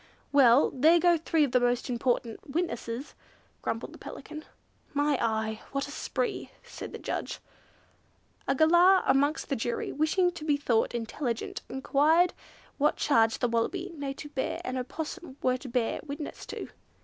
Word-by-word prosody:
"Well, 275 -1 +6
there 315 +6 +5
go 345 0 +5
three 325 -1 +1
of 280 - 0
the 250 - +4
most 245 0 +1
important 240 -2 -1
witnesses," 270 -5 -3 0.5
grumbled - - -3
the - - -13
Pelican. 310 0 -9 0.5
"My 290 0 +2
eye, 220 -1 -1
what 275 +1 -1
a - - -8
spree!" 415 +8 -3
said - - -8
the - - -6
judge. - - -4 1.1
A 270 - +2
Galah 350 +5 +6
amongst 285 +3 +2
the 275 - +1
jury, 235 0 -2
wishing 335 +5 +2
to 320 - -9
be 295 -2 +2
thought 240 -4 +1
intelligent, 235 +1 -3
enquired 305 +6 +3 0.5
what 295 +2 +3
charge 225 -6 +3
the 245 - +1
Wallaby, 330 +12 -1
Native 285 0 -6
Bear, 265 - -2
and 255 - -3
Opossum 295 +3 -5
were 255 0 +2
to 260 0 -9
bear 235 -1 0
witness 290 0 -7
to. - - -6
280 Hz, 155 wpm, -29 LUFS, 245-315 Hz, 1.1 s, Well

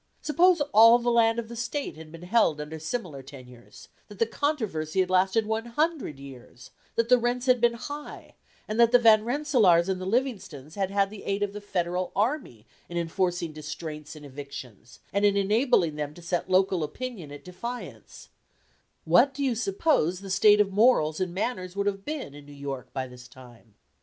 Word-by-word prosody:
Suppose 340 +2 +3
all 230 +2 +8
the 240 0 0
land 230 -1 +3
of 235 -1 -3
the 235 - -9
State 250 +5 -4
had 155 0 -12
been 165 +1 -11
held 180 -6 +2
under 150 +2 -6
similar 160 - -5
tenures; 125 -3 -14 0.2
that 205 - -13
the 230 - +2
controversy 215 - -2
had 185 0 +1
lasted 190 +4 +2
one 220 +1 -2
hundred 295 - -1
years; 130 -3 -13 0.2
that 230 0 +1
the 250 0 +5
rents 245 +1 -1
had 250 -2 +3
been 235 -1 +3
high; 290 +5 -8 0.3
and 215 +2 -3
that 235 -1 +6
the 245 - +7
Van 220 -3 +5
Rensselaers 235 - +3
and 190 -1 -2
the 185 - -4
Livingstons 190 - -2
had 195 -1 -2
had 200 0 +1
the 210 - -9
aid 200 +1 -1
of 200 -1 -3
the 210 - -7
Federal 180 -2 -2
army 210 - -2 0.2
in 175 - -5
enforcing 170 -1 -1
distraints 150 0 -7
and 150 -1 -11
evictions, 135 -5 -10
and 200 +1 +1
in 200 -1 +4
enabling 200 - +2
them 150 0 -4
to 175 - -12
set 175 +1 -2
local 185 -2 +2
opinion 185 - -6
at 145 - -11
defiance, 235 +8 -8 0.8
what 275 -1 +4
do 285 - -3
you 260 -3 +1
suppose 195 - 0
the 195 -1 -7
state 210 +2 +5
of 205 -1 +2
morals 195 -8 +3
and 185 -2 -1
manners 185 -2 -3
would 200 0 -1
have 195 -1 -2
been 290 - -5
in 145 0 -13
New 145 - -12
York 140 -2 -7
by 130 - -3
this 125 0 -13
time? 120 -4 -17
195 Hz, 190 wpm, -26 LUFS, 155-235 Hz, 0.8 s, all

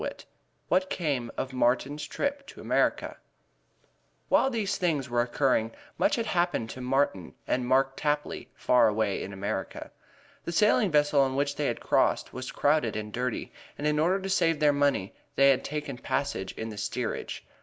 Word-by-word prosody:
IV - - -6 0.4
WHAT 185 +1 +2
CAME 140 -9 -1
OF 130 0 -3
MARTIN'S 130 +4 0
TRIP 280 0 -3
TO - - -12
AMERICA - - 0 1.1
While 270 - +4
these 225 -6 -1
things 150 -8 -1
were 120 0 +3
occurring, 120 -2 +1 0.3
much 300 - +3
had 230 - -1
happened 175 - 0
to 130 - -8
Martin 125 -8 0
and 125 -1 -1
Mark 135 +1 +2
Tapley 150 0 -2
far 125 - +4
away 105 -2 0
in 100 - -6
America. 100 +1 -4 0.5
The 170 - -4
sailing 210 +1 +4
vessel 150 -2 +3
on 130 -1 +1
which 140 +1 0
they 145 0 0
crossed - - +1
was 130 0 -5
crowded 145 -6 +1
and 105 -1 -5
dirty, 125 -1 -3 0.3
and 145 - -4
in 150 0 +2
order 180 +5 +2
to 190 - -5
save 165 -5 +2
their 150 -1 +4
money 140 -9 +1 0.2
they 140 0 +6
had 130 - +1
taken 145 -4 -5
passage 95 -11 -2
in 110 - -5
the 105 -2 -7
steerage. 115 +2 -4
140 Hz, 170 wpm, -28 LUFS, 120-155 Hz, 1.1 s, they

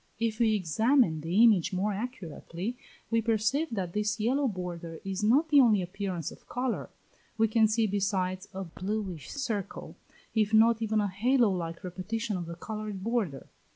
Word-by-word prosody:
If 225 -1 -1
we 220 -2 +4
examine 210 - +2
the 175 +8 +3
image 205 -4 +4
more 200 +3 0
accurately, 200 - -5 0.4
we 230 0 +3
perceive 225 +7 +1
that 185 -6 -3
this 210 +1 -1
yellow 265 +6 +2
border 175 -5 -5
is 195 +1 -3
not 275 +10 +4
the 290 -2 +7
only 215 -6 +4
appearance 180 -3 -4
of - - -16
colour; 250 -1 -2 0.5
we 225 0 +4
can 220 0 +4
see, 220 +1 +2
besides, 190 -2 -1
a 190 +1 -5
bluish 185 -3 -4
circle, 230 -9 -4 0.4
if 220 -1 +2
not 225 +1 +5
even 220 -1 +1
a 205 - +1
halo 230 +4 +2
like 170 -2 -4
repetition 195 +5 -3
of 175 -2 -4
the 170 - -6
coloured 210 +1 -6
border. 215 - -1
210 Hz, 165 wpm, -29 LUFS, 185-230 Hz, 0.5 s, the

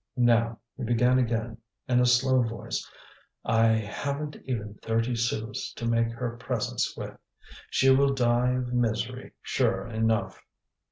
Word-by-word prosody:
"Now," 115 -2 +3 0.2
he - - -5
began 125 +2 +3
again, 115 -1 -1 0.3
in 125 -1 +3
a 125 - +4
slow 130 +1 +4
voice, 115 -1 -4 0.6
"I 115 0 +4
haven't 140 +7 -1
even 110 -5 -3
thirty 115 +2 0
sous 115 -2 -2
to 115 - -5
make 115 0 +2
her 120 0 -4
presents 115 - -2
with. - - -6 0.5
She 135 0 +4
will 140 +1 +4
die 120 0 +2
of 125 -1 -2
misery, 120 -3 -1
sure 95 0 0
enough." 110 -1 -1
120 Hz, 135 wpm, -27 LUFS, 115-125 Hz, 0.6 s, a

